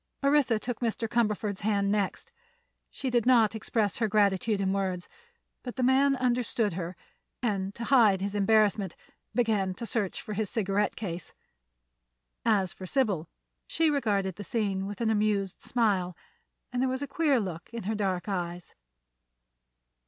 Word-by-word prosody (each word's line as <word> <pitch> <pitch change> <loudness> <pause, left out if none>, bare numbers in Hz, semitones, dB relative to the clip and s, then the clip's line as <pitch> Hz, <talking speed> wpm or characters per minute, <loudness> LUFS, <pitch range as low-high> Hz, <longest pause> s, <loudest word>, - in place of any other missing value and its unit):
Orissa 280 -5 +4
took 240 +2 -4
Mr. 230 -1 -1
Cumberford's 210 -3 0
hand 200 -1 +1
next. 205 -2 -1 0.6
She 265 -2 -4
did 240 -1 +2
not 230 -5 +5
express 220 -1 -1
her 225 - +1
gratitude 205 0 +2
in 190 -1 +1
words, 185 -2 -2 0.5
but 245 - -7
the 255 - -1
man 270 +2 +4
understood 245 -5 0
her 175 0 -4 0.5
and 200 -4 -1
to 235 - -5
hide 230 -7 +5
his 200 +1 -3
embarrassment 205 -2 +2 0.4
began 210 -6 +1
to 235 - -5
search 215 -5 -1
for 215 - -6
his 210 -1 -1
cigarette 205 -2 0
case. 175 -5 -6 1.1
As 200 -5 +2
for 185 - -9
Sybil, 200 - 0 0.4
she 325 -1 +2
regarded 200 -9 0
the 205 - -6
scene 195 -3 -1
with 205 +2 -6
an 225 -1 +2
amused 205 -3 0
smile, 195 -7 0 0.6
and 245 - 0
there 260 - +2
was 260 +2 -2
a - - -3
queer 285 -2 +2
look 180 -5 -5
in 230 -2 -5
her 210 +4 -1
dark 190 -3 -1
eyes. 175 -3 -4
210 Hz, 155 wpm, -28 LUFS, 195-235 Hz, 1.1 s, not